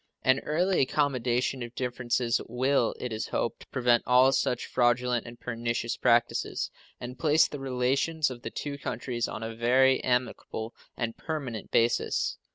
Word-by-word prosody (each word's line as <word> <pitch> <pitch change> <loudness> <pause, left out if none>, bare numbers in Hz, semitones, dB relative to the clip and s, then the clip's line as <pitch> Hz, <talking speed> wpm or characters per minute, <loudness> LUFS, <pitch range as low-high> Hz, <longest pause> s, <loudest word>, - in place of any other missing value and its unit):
An 130 +1 +4
early 175 +7 +1
accommodation 130 -2 0
of 120 0 -7
differences 125 -1 0
will, 125 0 +1
it 125 -3 -4
is 110 - -3
hoped, 115 - -3
prevent 120 -2 +3
all 125 +2 +6
such 125 -2 0
fraudulent 120 -1 +1
and 120 0 -11
pernicious 115 0 -2
practices, 120 -1 +1 0.3
and 125 +1 -8
place 155 +1 +4
the 145 - -7
relations 135 +4 0
of 120 -1 -8
the 115 - -5
two 140 +3 -5
countries 120 -3 -3
on 110 - -6
a 115 0 -4
very 130 +3 +3
amicable 125 -2 -2 0.2
and 115 -2 -2
permanent 135 -9 -5
basis. 115 0 +1
125 Hz, 150 wpm, -28 LUFS, 120-135 Hz, 0.3 s, all